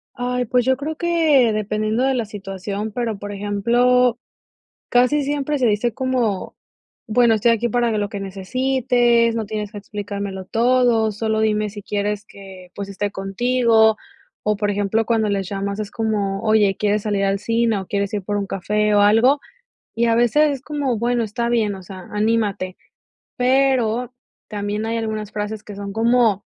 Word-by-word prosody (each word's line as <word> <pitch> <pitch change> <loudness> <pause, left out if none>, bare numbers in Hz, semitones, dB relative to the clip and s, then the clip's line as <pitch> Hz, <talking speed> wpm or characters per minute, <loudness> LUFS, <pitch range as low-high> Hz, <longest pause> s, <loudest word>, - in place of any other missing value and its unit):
Ay, 250 0 -1
pues 245 +1 +1
yo 260 0 +3
creo 305 +3 -4
que 315 -9 +3
dependiendo 215 +2 -1
de 270 0 +2
la 235 -4 -1
situación, 200 +1 -5
pero, 225 -4 -2
por 205 0 -7
ejemplo, 235 +5 +2 0.7
casi 250 +4 +3
siempre 290 +1 -1
se 255 - +1
dice 215 +2 +1
como: 245 -7 -1 0.5
"Bueno, 235 +1 +4
estoy 230 +2 +3
aquí 230 +1 0
para 235 -2 +1
lo 205 -1 -1
que 200 - -5
necesites, 240 +3 +1
no 225 -2 -2
tienes 210 0 -4
que 210 - -8
explicármelo 200 -1 -5
todo, 235 -1 +2
solo 220 +1 -1
dime 215 -1 +1
si 205 0 -9
quieres 205 +1 -2
que, 190 -2 -13
pues 200 -1 -6
esté 205 +1 -2
contigo". 220 +2 +2 0.5
O 210 -1 +1
por 205 -1 0
ejemplo, 205 +2 0
cuando 220 -3 +1
les 195 -2 -1
llamas 200 +1 -3
es 210 -1 -4
como: 205 -3 -1
"Oye, 215 -3 +3
¿quieres 210 0 0
salir 205 -2 0
al 195 0 +1
cine 230 -1 +1
o 190 - -8
quieres 200 0 -2
ir 205 - -1
por 205 +1 -3
un 200 -1 -1
café 210 +3 0
o - - +5
algo?" 225 +7 +4 0.5
Y 235 +1 +1
a 230 -1 +3
veces 290 +6 +3
es 270 -2 -4
como: 280 -5 -2
"Bueno, 240 +1 0
está 235 +3 -2
bien, 215 -4 +1
o 190 - -10
sea, 185 0 -10
anímate". 210 -4 0 0.6
Pero 250 -2 +2 0.4
también 210 +1 -3
hay 230 +1 -1
algunas 215 -2 -4
frases 210 0 -4
que 205 - -9
son 200 0 -6
como: 225 -3 +2
220 Hz, 175 wpm, -21 LUFS, 205-240 Hz, 0.7 s, o